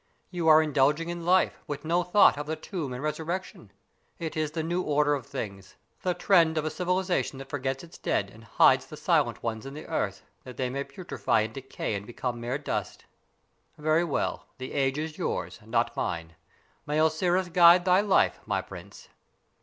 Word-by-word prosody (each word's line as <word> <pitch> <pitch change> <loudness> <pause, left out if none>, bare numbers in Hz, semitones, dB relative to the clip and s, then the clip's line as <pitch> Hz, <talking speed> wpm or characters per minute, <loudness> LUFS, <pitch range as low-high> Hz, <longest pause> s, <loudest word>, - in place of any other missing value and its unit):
You 175 -3 -2
are 155 0 +7
indulging 150 +2 +2
in 175 -1 -5
life, 185 +1 +3
with 145 +1 -5
no 170 +2 +2
thought 180 +4 +5
of 145 +1 -5
the 160 - -2
tomb 175 -1 -5
and - - -4
the 125 - -6
resurrection. 160 +5 -4 0.5
It 165 -3 -5
is 155 -1 0
the 160 +1 -3
new 175 +3 -1
order 145 -2 +2
of 140 -4 -4
things, 95 -2 -7 0.3
the 180 -1 0
trend 165 -5 +3
of 155 - 0
a 155 - -1
civilization 180 -4 -1
that 135 0 -9
forgets 135 0 -2
its 170 0 -13
dead 100 -1 -1
and 110 - -15
hides 110 - +4
the - - -10
silent - - +1
ones 110 -1 -3
in 135 +1 -8
the 155 - -8
earth, 100 -1 -2 0.2
that 125 -1 -10
they 125 -2 -1
may 140 +1 -3
putrify 180 - -1
and 110 - -8
decay 135 -4 -5
and 100 0 -5
become 120 0 -4
mere 120 +3 -2
dust. 145 - -4 0.7
Very 155 +2 +2
well; 165 -5 -2
the 130 0 -7
age 135 -1 +1
is 155 0 -4
yours, 90 0 -3
not 115 +2 0
mine. 85 -1 -3 0.5
May 150 +1 0
Osiris 175 +3 +2
guide 175 +1 +7
thy 185 +1 +5
life, 200 -2 +2
my - - 0
prince!" - - -12
150 Hz, 195 wpm, -27 LUFS, 130-170 Hz, 0.7 s, are